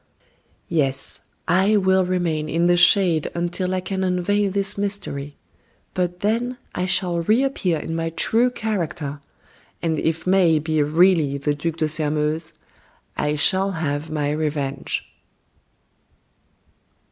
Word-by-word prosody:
Yes, 135 -5 -1 0.3
I 190 +5 +3
will 190 -1 +3
remain 170 -4 -1
in 165 +2 +1
the 175 0 +4
shade 175 -3 +4
until 175 +2 -1
I 185 - -1
can 190 0 -3
unveil 190 +3 +1
this 200 0 +1
mystery; 195 -9 -4 0.6
but 180 -1 -2
then 235 +4 0 0.2
I 180 - -1
shall 180 -1 +1
reappear 215 -3 +1
in 165 +2 -5
my 165 0 -1
true 230 +9 +2
character. 170 - -3 0.6
And 160 -2 -1
if 160 0 -1
May 185 -4 +4
be 155 0 0
really 155 -1 +3
the 145 +1 -1
Duc 160 +2 -3
de 155 - +1
Sairmeuse, 155 +1 0 0.6
I 150 0 0
shall 190 +6 +2
have 155 -2 -3
my 150 -2 -1
revenge." 145 -3 -2
170 Hz, 125 wpm, -22 LUFS, 155-190 Hz, 0.6 s, the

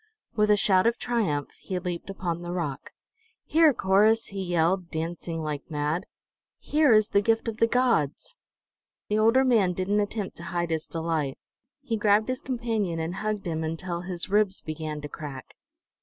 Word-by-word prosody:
With 210 -1 +2
a 210 - +5
shout 195 0 +4
of 235 0 +1
triumph 200 - -1
he 185 - -3
leaped 180 0 -4
upon 175 -3 -3
the 175 0 -5
rock. 150 -6 -4 0.6
"Here, 320 -1 +5
Corrus!" 215 0 +3
he 195 -1 -5
yelled, 175 0 +1
dancing 165 0 -4
like 150 0 -4
mad. 150 +4 -2 0.5
"Here 300 -3 +2
is 215 -1 +5
the 200 - +3
gift 225 +2 +1
of 225 -1 -3
the 230 - +4
gods!" 240 - +1 0.7
The 210 +1 +2
older 230 +5 +5
man 220 -8 +3
didn't 190 +3 0
attempt 205 -1 -3
to 170 - -9
hide 175 -2 -2
his 160 -1 -2
delight. 160 -4 -2 0.5
He 230 -5 -1
grabbed 210 +2 +3
his 255 0 -2
companion 225 -9 -2
and 165 +3 -3
hugged 215 -1 -2
him 160 -2 -2
until 170 +2 -3
his 175 -1 -4
ribs 205 -1 +3
began 155 -1 -5
to 150 - -5
crack. 145 -3 -8
185 Hz, 170 wpm, -26 LUFS, 165-215 Hz, 0.7 s, a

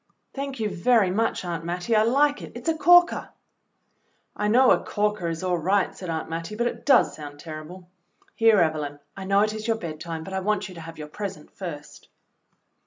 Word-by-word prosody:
"Thank 275 -2 -5
you 220 - 0
very 200 +1 +2
much. 215 -1 0
Aunt 170 -2 -4
Mattie. 175 +6 -1
I 215 - +5
like 285 +6 +2
it. - - -9
It's 240 +4 -8
a 325 - +3
corker." 350 +2 +5 1.1
"I 210 - -1
know 250 +4 +5
'a - - +3
corker' 210 -4 -1
is 165 +2 -4
all 180 -2 0
right," 190 +4 +1
said 185 - -7
Aunt 160 -1 -3
Mattie, 165 +5 -5
"but 235 +2 -1
it 240 - -4
does 270 -3 +5
sound 145 -1 -9
terrible. 160 +4 -9 0.5
Here, 225 -2 +4
Evelyn, 150 -3 -1 0.2
I 195 - -7
know 200 +1 +3
it 215 0 +1
is 215 +1 -5
your 225 -1 +1
bedtime, 165 -2 -6
but 190 - -8
I 190 - 0
want 205 +1 -1
you 185 - -11
to 170 - -10
have 165 0 -10
your 150 -1 -7
present 190 -1 -7
first." 150 -6 -9
190 Hz, 205 wpm, -25 LUFS, 165-225 Hz, 1.1 s, I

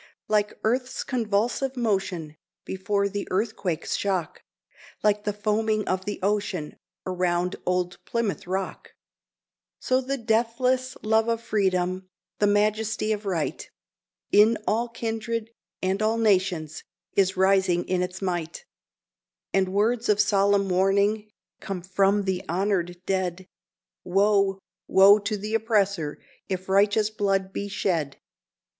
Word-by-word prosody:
Like 210 -1 +1
earth's 250 +3 0
convulsive 245 +3 -1
motion 190 -9 -1 0.3
before 200 +1 -1
the 200 0 -4
earthquake's 190 -4 -1
shock, 190 -5 -2 0.6
Like 210 0 +2
the 210 - +1
foaming 215 +1 0
of 185 0 -1
the 205 - -4
ocean 200 -6 -1 0.3
around 180 -1 0
old 180 0 -1
Plymouth 205 -5 -2
Rock, 190 +1 -4 0.8
So 255 0 +1
the 270 +2 -2
deathless 245 +3 0
love 220 +1 +2
of 230 -1 +1
Freedom 185 -4 0 0.3
the 205 - +4
majesty 215 +1 +1
of 210 -1 -2
Right 170 -5 -2 0.6
In 215 +2 +6
all 235 +3 0
kindred, 230 0 -3 0.3
and 190 +2 0
all 220 +1 +2
nations, 185 -8 +1 0.3
is 190 -1 +2
rising 190 -2 +3
in 185 -1 +1
its 180 +1 -4
might; 175 - -3 0.9
And 190 -1 +2
words 220 +4 +1
of 210 -1 +3
solemn 200 -1 +3
warning 200 +3 +2 0.3
come 185 -3 -5
from 195 +2 +2
the 190 -2 -1
honored 180 -1 0
dead 185 -1 -1 0.6
"Woe, 195 +1 +2 0.3
woe 200 +2 +7
to 210 +1 -2
the 210 +2 -5
oppressor 200 -8 +1 0.3
if 185 0 -4
righteous 205 +2 +3
blood 195 -2 0
be 200 - -3
shed! 170 -8 -1
200 Hz, 125 wpm, -25 LUFS, 185-215 Hz, 0.9 s, woe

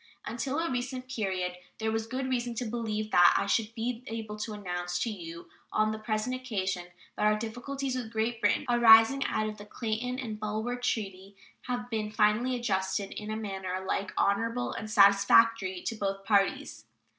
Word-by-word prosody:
Until 265 +4 -3
a 335 -2 -1
recent 255 +1 -3
period 190 -7 -2 0.2
there 220 0 -1
was 225 0 -2
good 260 +3 -3
reason 245 -2 -1
to 245 - -2
believe 215 -2 -3
that 175 0 +6
I - - 0
should 220 +2 0
be 235 +1 -3
able 220 -2 -5
to 215 0 -4
announce 180 -3 -3
to 230 - -2
you 170 -4 -8 0.2
on 215 0 +2
the 220 - -4
present 215 +3 -1
occasion 190 -8 -3 0.3
that - - 0
our 210 0 +3
difficulties 255 +4 -4
with 240 -3 -4
Great 225 +1 -1
Britain 205 +7 +2
arising 240 +2 +7
out 215 - 0
of 215 -1 -6
the 205 - -9
Clayton 235 +3 -3
and 225 -5 -5
Bulwer 215 +3 -2
treaty 200 -5 -3 0.3
had 245 -1 -2
been 215 -1 -1
finally 215 +4 +2
adjusted 195 -4 -1
in 210 0 -6
a 215 - -2
manner 190 -4 -4
alike 190 +1 -2
honorable 230 +5 +1
and 215 - -6
satisfactory 200 -1 +5
to 230 - -2
both 195 -2 -3
parties. 200 -2 +1
220 Hz, 180 wpm, -29 LUFS, 200-240 Hz, 0.3 s, arising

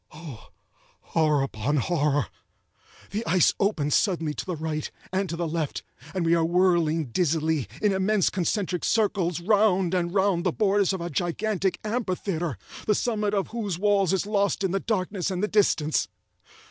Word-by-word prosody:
Oh, 150 -7 -10 0.7
horror 155 -4 +3
upon 135 +3 -1
horror!—the 150 - -3
ice 180 -1 +4
opens 160 -8 +1
suddenly 165 -7 +1
to - - -5
the 180 - -2
right, 155 -1 -3 0.2
and 190 0 0
to 170 - -3
the 170 0 -2
left, 160 -2 -3 0.3
and 180 -3 0
we 165 - +3
are 165 -1 +3
whirling 165 -4 +2
dizzily, 160 - 0 0.2
in 210 -2 +3
immense 190 0 +2
concentric 185 -1 -1
circles, 190 -6 +1
round 195 -2 +3
and 175 -2 0
round 190 -2 +2
the 180 - +1
borders 200 0 +2
of 190 -2 -3
a 170 - -4
gigantic 185 +4 -1
amphitheatre, 185 - -2 0.3
the 210 - +3
summit 210 -3 0
of 195 - -1
whose 210 -7 -3
walls 200 -2 +2
is 190 0 0
lost 200 -1 0
in 190 - +1
the 195 - 0
darkness 195 -3 -2
and 185 0 -2
the - - +2
distance. 175 -8 +2
180 Hz, 160 wpm, -26 LUFS, 160-200 Hz, 0.7 s, ice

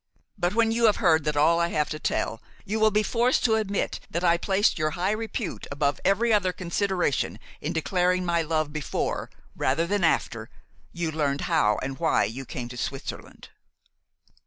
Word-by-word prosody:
But 180 0 -1
when 225 -1 +3
you 230 -1 +4
hear 205 -2 -1
all 160 -1 +6
that 150 -1 -2
I 170 +3 +4
have 150 -3 -1
to 155 - -4
tell, 115 - -2 0.2
you 215 +3 -2
will 220 0 +5
be 210 +1 +1
forced 240 +3 +1
to 225 - +4
admit 210 -2 -1
that 170 - -3
I 170 -1 +5
placed 190 +2 +1
your 155 0 +1
high 185 +3 +1
repute 220 -2 -4
above 140 0 0
every 225 +4 +3
other 190 -3 +2
consideration 180 -3 -1 0.2
in 150 - -2
declaring 180 +2 +1
my 170 -1 +1
love 155 -2 -1
before, 155 -3 -2 0.3
rather 140 +6 +1
than 200 +1 0
after, 165 - 0 0.4
you 170 -2 -2
learned 145 -3 -1
how 105 0 +2
and 135 +2 -5
why 165 -1 +3
you 120 +6 -4
came 120 0 -5
to 125 - -9
Switzerland." 135 +2 -6
170 Hz, 180 wpm, -26 LUFS, 150-205 Hz, 0.4 s, all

